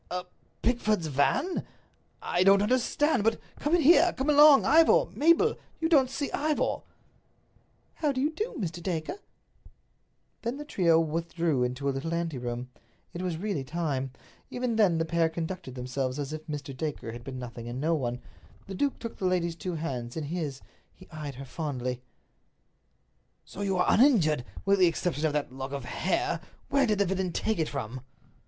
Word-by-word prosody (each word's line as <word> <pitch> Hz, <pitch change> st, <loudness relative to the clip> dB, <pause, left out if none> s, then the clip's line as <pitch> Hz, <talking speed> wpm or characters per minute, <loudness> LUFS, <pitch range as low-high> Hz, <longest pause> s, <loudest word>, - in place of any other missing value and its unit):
"A 180 Hz, +1 st, -3 dB, 0.4 s
Pickford's 215 Hz, -6 st, +1 dB
van? 160 Hz, -, +1 dB, 0.6 s
I 175 Hz, -, +1 dB
don't 195 Hz, +1 st, +6 dB
understand. 255 Hz, +3 st, +2 dB
But 225 Hz, +1 st, +2 dB, 0.2 s
come 295 Hz, +4 st, +2 dB
in 345 Hz, -, +2 dB
here. 345 Hz, +3 st, +6 dB
Come 270 Hz, +3 st, 0 dB
along, 295 Hz, -1 st, +8 dB
Ivor. 330 Hz, +10 st, +6 dB
Mabel, 335 Hz, +9 st, +3 dB, 0.2 s
you 325 Hz, -, +1 dB
don't 280 Hz, -6 st, +4 dB
see 280 Hz, +2 st, -3 dB
Ivor." 300 Hz, +1 st, 0 dB, 1.1 s
"How 300 Hz, -3 st, 0 dB
do 260 Hz, -, -3 dB
you 295 Hz, +4 st, +1 dB
do, 425 Hz, +9 st, -4 dB
Mr. 175 Hz, -5 st, -4 dB
Dacre?" 170 Hz, -, -3 dB, 1.2 s
Then 235 Hz, +3 st, -3 dB
the 295 Hz, -, -7 dB
trio 170 Hz, -, +3 dB
withdrew 165 Hz, -3 st, 0 dB
into 125 Hz, +3 st, -2 dB
a -, -, +3 dB
little 145 Hz, +5 st, -3 dB
anteroom; 125 Hz, -7 st, -3 dB, 0.4 s
it 175 Hz, -, -5 dB
was 180 Hz, -3 st, -2 dB
really 195 Hz, -6 st, -2 dB
time. 140 Hz, -3 st, -2 dB, 0.4 s
Even 245 Hz, -2 st, -2 dB
then 200 Hz, -7 st, +4 dB
the 165 Hz, -, 0 dB
pair 165 Hz, 0 st, +2 dB
conducted 165 Hz, -4 st, -5 dB
themselves 130 Hz, +1 st, -3 dB
as 145 Hz, 0 st, -4 dB
if 155 Hz, 0 st, -7 dB
Mr. 145 Hz, -3 st, -5 dB
Dacre 140 Hz, -5 st, -4 dB
had 120 Hz, +1 st, -9 dB
been 130 Hz, 0 st, -6 dB
nothing 120 Hz, -2 st, -7 dB
and 120 Hz, +2 st, -5 dB
no 160 Hz, +4 st, +1 dB
one. 125 Hz, -5 st, -2 dB, 0.4 s
The 195 Hz, -, -7 dB
duke 280 Hz, +8 st, 0 dB
took 230 Hz, -, -7 dB
the 190 Hz, -, -3 dB
lady's 175 Hz, -2 st, +1 dB
two 180 Hz, +1 st, -4 dB
hands 130 Hz, -6 st, -4 dB
in 160 Hz, -, -2 dB
his. 150 Hz, -3 st, -4 dB, 0.3 s
He -, -, -16 dB
eyed 150 Hz, -4 st, -6 dB
her 135 Hz, +2 st, -8 dB
fondly. 125 Hz, -3 st, -4 dB, 1.4 s
"So 195 Hz, -, -9 dB
you 195 Hz, -2 st, 0 dB
are 180 Hz, -, +3 dB
uninjured, 175 Hz, -, +4 dB, 0.2 s
with 200 Hz, 0 st, +3 dB
the 180 Hz, -, +6 dB
exception 165 Hz, -2 st, 0 dB
of 150 Hz, -, -2 dB
that 145 Hz, -4 st, -2 dB
lock 135 Hz, +1 st, -6 dB
of 140 Hz, -3 st, -4 dB
hair. 355 Hz, -, -1 dB, 0.3 s
Where 280 Hz, -2 st, +3 dB
did 210 Hz, -2 st, +2 dB
the 200 Hz, -, +3 dB
villain 190 Hz, -1 st, -1 dB
take 220 Hz, +4 st, -1 dB
it 160 Hz, -, 0 dB
from?" 130 Hz, -2 st, -5 dB
170 Hz, 175 wpm, -28 LUFS, 140-230 Hz, 1.4 s, along